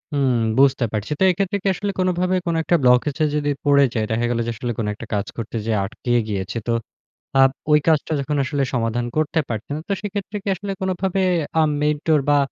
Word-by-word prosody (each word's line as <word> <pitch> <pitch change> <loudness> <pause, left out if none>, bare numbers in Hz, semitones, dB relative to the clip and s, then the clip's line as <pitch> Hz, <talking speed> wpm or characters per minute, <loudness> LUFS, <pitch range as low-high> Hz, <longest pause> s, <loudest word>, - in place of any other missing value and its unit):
উম 135 -3 +2 0.2
বুঝতে 135 -3 +4
পারছি। 105 +5 -3
তো - - +3
এক্ষেত্রে 195 +2 -1
কি - - 0
আসলে, 205 +2 -3
কোনভাবে 185 0 +1
কোন 165 - +1
একটা 175 - +2
ব্লকেজে 135 +5 +3
যদি 145 -1 0 0.2
পড়ে 140 -1 +5
যায় 110 -2 0
দেখা 115 +2 +1
গেল 120 -1 0
যে, - - 0
আসলে 120 +2 -3
কোন 105 - -1
একটা 115 - -9
কাজ 100 -1 0
করতে 115 0 -5
যেয়ে 110 -2 +1
আটকিয়ে 120 +4 -1
গিয়েছে। 100 +1 -3
তো 115 - +2 0.7
আব 135 - +7 0.2
ঐ - - +6
কাজটা 160 0 +2
যখন 145 +2 -2
আসলে 140 +1 -1
সমাধান 120 0 0
করতে 155 +1 +1
পারতেন। 115 +5 -4
তো - - -4
সেক্ষেত্রে 205 0 -4
কি - - -10
আসলে, 195 +2 -5
কোনভাবে 190 0 -1 0.4
আ - - +6 0.2
মেন্টর, 150 +1 +2
বা 145 - +5
145 Hz, 200 wpm, -21 LUFS, 120-175 Hz, 0.7 s, আব